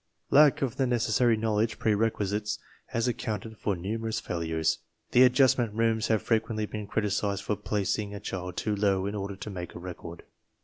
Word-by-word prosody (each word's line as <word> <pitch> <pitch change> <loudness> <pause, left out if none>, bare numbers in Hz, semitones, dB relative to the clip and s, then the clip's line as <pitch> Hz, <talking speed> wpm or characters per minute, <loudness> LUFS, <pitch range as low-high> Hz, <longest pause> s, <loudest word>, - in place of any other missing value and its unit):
Lack 145 -1 +6
of 130 0 -2
the 135 -2 +2
necessary 120 -1 +2
knowledge 110 0 0
prerequisites 105 -1 0 0.3
has 115 -1 -1
accounted 110 -2 -3
for 100 - 0
numerous 110 +5 -3
failures. 80 -2 -1 0.3
The 125 - +6
Adjustment 125 -3 +4
Rooms 115 0 +2
have 110 -2 +1
frequently 110 -1 0
been 105 -1 -6
criticized 100 -1 -1
for 105 - 0
"placing" 105 0 -2
a - - -5
child 90 -3 -5
too 105 -1 0
low 100 -2 +1
in 100 - -2
order 100 -1 -4
to 100 +2 -7
make 90 -2 -6
a - - -6
record. 85 -1 -8
105 Hz, 170 wpm, -28 LUFS, 100-115 Hz, 0.3 s, Lack